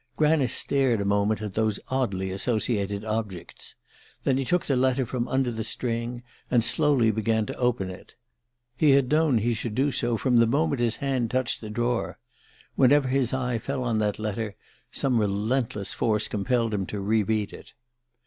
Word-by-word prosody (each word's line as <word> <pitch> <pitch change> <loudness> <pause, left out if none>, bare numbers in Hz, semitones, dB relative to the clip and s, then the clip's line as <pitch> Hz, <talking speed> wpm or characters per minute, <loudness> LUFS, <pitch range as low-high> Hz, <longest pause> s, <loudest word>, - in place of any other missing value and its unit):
Granice 150 -5 +3
stared 135 -5 +2
a 100 - -1
moment 100 +2 +1
at 105 -2 -5
these 110 -1 0
oddly 100 -8 -1
associated 105 0 -1
objects; 105 -5 -4 0.5
then 135 - +2
he 135 - 0
took 175 +6 +1
the 140 - +1
letter 130 +1 +2
from 120 0 -3
under 130 -2 0
the 110 -1 -4
string 120 +1 -3 0.3
and 120 -3 +3
slowly 125 -2 +3
began 110 0 0
to - - -6
open 120 -7 0
it. 90 - -13 0.6
He 145 +1 +4
had 135 -1 +3
known 155 -4 +3
he 115 +2 +1
should 110 -1 -4
do 140 +3 +2
so 120 -3 0
from 125 +1 +2
the 115 0 +5
moment 140 +1 +1
his 115 -2 +2
hand 130 -4 -1
touched 130 0 -1
the 110 - -7
drawer. 120 +2 -1 0.6
Whenever 135 0 +4
his 130 -2 +1
eye 125 -3 -1
fell 135 +3 -3
on 115 -3 0
that 105 -1 0
letter 110 -1 -3 0.4
some 125 -4 +1
relentless 105 0 0
force 110 -2 0
compelled 115 +2 0
him 95 -3 -2
to 105 - -4
re 105 +3 +2
read 105 0 -1
it. - - -12
115 Hz, 180 wpm, -26 LUFS, 105-130 Hz, 0.6 s, the